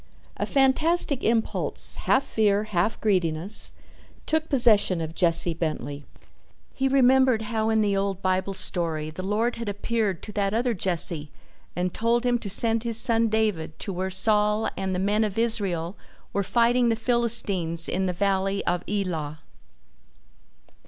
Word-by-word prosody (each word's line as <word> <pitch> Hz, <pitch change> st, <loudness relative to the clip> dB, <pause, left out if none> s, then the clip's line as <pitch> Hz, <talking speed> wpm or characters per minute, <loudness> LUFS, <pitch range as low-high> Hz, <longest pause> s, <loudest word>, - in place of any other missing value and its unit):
A -, -, -3 dB
fantastic 285 Hz, +2 st, +2 dB
impulse, 225 Hz, -1 st, 0 dB
half 265 Hz, -, +3 dB
fear, 210 Hz, -2 st, 0 dB
half 210 Hz, 0 st, -2 dB
greediness, 185 Hz, -1 st, +3 dB, 0.5 s
took 315 Hz, 0 st, -1 dB
possession 220 Hz, -, +3 dB
of 160 Hz, 0 st, -5 dB
Jesse 170 Hz, -1 st, +4 dB
Bentley. 145 Hz, -3 st, -5 dB, 0.7 s
He 270 Hz, -, -1 dB
remembered 260 Hz, -3 st, +3 dB
how 220 Hz, 0 st, -2 dB
in 220 Hz, -1 st, +2 dB
the 200 Hz, -1 st, 0 dB
old 195 Hz, -1 st, -2 dB
Bible 190 Hz, +1 st, -1 dB
story 160 Hz, -5 st, 0 dB
the 155 Hz, -, -8 dB
Lord 215 Hz, +5 st, -1 dB
had 230 Hz, -2 st, -5 dB
appeared 205 Hz, -2 st, -2 dB
to 210 Hz, -, -7 dB
that 200 Hz, 0 st, -1 dB
other 240 Hz, +1 st, 0 dB
Jesse 170 Hz, -5 st, 0 dB, 0.5 s
and 180 Hz, 0 st, -2 dB
told 235 Hz, +2 st, 0 dB
him 245 Hz, -1 st, +1 dB
to 205 Hz, -, -6 dB
send 225 Hz, +3 st, +1 dB
his 230 Hz, -2 st, 0 dB
son 230 Hz, -1 st, +2 dB
David 210 Hz, -8 st, -2 dB
to 200 Hz, -, -6 dB
where 185 Hz, +1 st, -3 dB
Saul 210 Hz, +3 st, +1 dB
and 190 Hz, -1 st, -3 dB
the -, -, -2 dB
men 205 Hz, +3 st, 0 dB
of 210 Hz, -2 st, -4 dB
Israel 200 Hz, -7 st, -2 dB, 0.4 s
were 200 Hz, -, 0 dB
fighting 240 Hz, +4 st, +2 dB
the 225 Hz, -, +1 dB
Philistines 220 Hz, -8 st, -1 dB
in 190 Hz, +1 st, -2 dB
the -, -, -1 dB
Valley 195 Hz, +1 st, -1 dB
of 175 Hz, 0 st, -1 dB
Elah. 165 Hz, -7 st, -4 dB
205 Hz, 150 wpm, -24 LUFS, 180-230 Hz, 0.7 s, Jesse